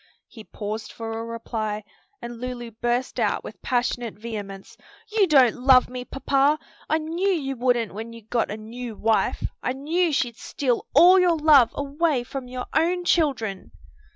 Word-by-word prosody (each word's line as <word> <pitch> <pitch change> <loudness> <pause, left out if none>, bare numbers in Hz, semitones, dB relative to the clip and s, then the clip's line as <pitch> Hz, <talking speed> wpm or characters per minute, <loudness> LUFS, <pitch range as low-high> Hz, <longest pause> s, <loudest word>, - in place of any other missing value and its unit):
He 220 - -12
paused 215 +1 -6
for 225 -1 -6
a 225 0 -4
reply, 225 -2 -4 0.4
and 235 0 -7
Lulu 245 -2 -5
burst 240 +3 -2
out - - 0
with - - -10
passionate 245 -2 -1
vehemence, 205 -3 -7 0.4
"You 425 -3 +3
don't 265 -7 +5
love 255 0 +5
me, 250 0 -6
papa! 275 +2 +1 0.3
I 315 - +3
knew 330 +5 -1
you 280 -8 -1
wouldn't 245 -3 0
when 225 +3 -7
you 230 -1 -12
got 230 +2 -1
a 210 - -4
new 230 +1 -7
wife. 220 +1 +1 0.2
I 250 - -1
knew 320 +6 0
she'd 245 -5 -1
steal 250 -4 -2
all 355 +5 +8
your 350 -2 +3
love 295 -6 +6
away 285 -1 0
from 260 +1 -7
your 250 0 -5
own 350 +3 +1
children!" 260 - 0
250 Hz, 165 wpm, -24 LUFS, 230-295 Hz, 0.4 s, all